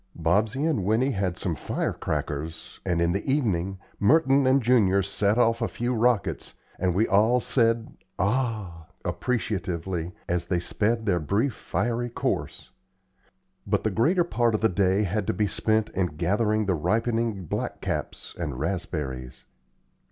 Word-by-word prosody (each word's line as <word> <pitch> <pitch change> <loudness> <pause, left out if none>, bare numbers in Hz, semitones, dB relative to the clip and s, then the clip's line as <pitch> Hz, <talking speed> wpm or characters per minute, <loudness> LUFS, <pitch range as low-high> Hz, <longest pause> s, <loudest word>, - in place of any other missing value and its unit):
Bobsey 105 - +1
and 150 - +1
Winnie 110 +7 +2
had 95 -5 -1
some 90 - -2
firecrackers, 80 +1 -3
and, 85 -2 0
in 85 0 +2
the 100 +3 -1
evening, 95 - 0 0.2
Merton 135 +3 +4
and 130 +1 +5
Junior 110 -6 +3
set 100 +2 +1
off 115 -1 +3
a 115 - +1
few 120 +2 -2
rockets, 120 -3 0 0.2
and 90 -1 +1
we 110 +4 +3
all 110 +5 +4
said, 115 -1 +1 0.2
"Ah!" 100 -6 -1 0.2
appreciatively, 90 -7 -2 0.2
as 85 0 -1
they 90 -2 +1
sped 110 +5 -1
their 90 -4 +2
brief 105 - 0
fiery 120 +3 -2
course; 120 - -3 1.0
but 100 0 +1
the 110 - +1
greater 160 - +3
part 120 -9 +1
of - - -2
the 110 - +4
day 95 +2 +2
had 105 +1 -1
to - - +1
be 105 +4 +1
spent 110 +1 0
in 95 -2 0
gathering 105 +7 0
the 95 - +1
ripening 110 +4 0
black - - -3
caps - - -4
and 75 -7 -3
raspberries. 75 -6 -4
105 Hz, 150 wpm, -26 LUFS, 90-115 Hz, 1.0 s, and